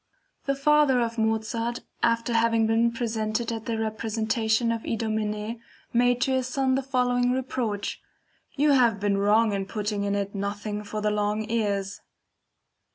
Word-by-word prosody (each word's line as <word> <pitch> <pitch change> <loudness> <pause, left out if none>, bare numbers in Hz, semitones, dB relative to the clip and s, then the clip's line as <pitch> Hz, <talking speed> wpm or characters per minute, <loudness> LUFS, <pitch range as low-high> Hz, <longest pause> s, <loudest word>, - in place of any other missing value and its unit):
The 275 - +1
father 290 -2 +4
of 230 -1 -1
Mozart 225 +2 -1 0.2
after 230 +1 +1
having 230 -1 +3
been 225 +1 +3
present 220 -3 -1
at 230 -1 -4
a 225 - 0
representation 220 +1 0
of 230 -1 -2
IDOMENEE 220 0 -2 0.3
made 245 +1 +3
to 265 - +2
his 260 -1 0
son 260 0 +1
the 265 - +1
following 250 -2 +1
reproach: 250 -5 -2 0.5
"You 295 +1 +3
have 240 -6 +4
been 200 0 +1
wrong 210 +2 +3
in 195 -1 -2
putting 210 -1 -2
in 200 0 0
it 200 0 -2
nothing 205 +1 -4
for 210 +1 -5
the 210 0 +1
long 210 +1 -1
ears." 200 -3 -1
225 Hz, 155 wpm, -26 LUFS, 210-245 Hz, 0.5 s, father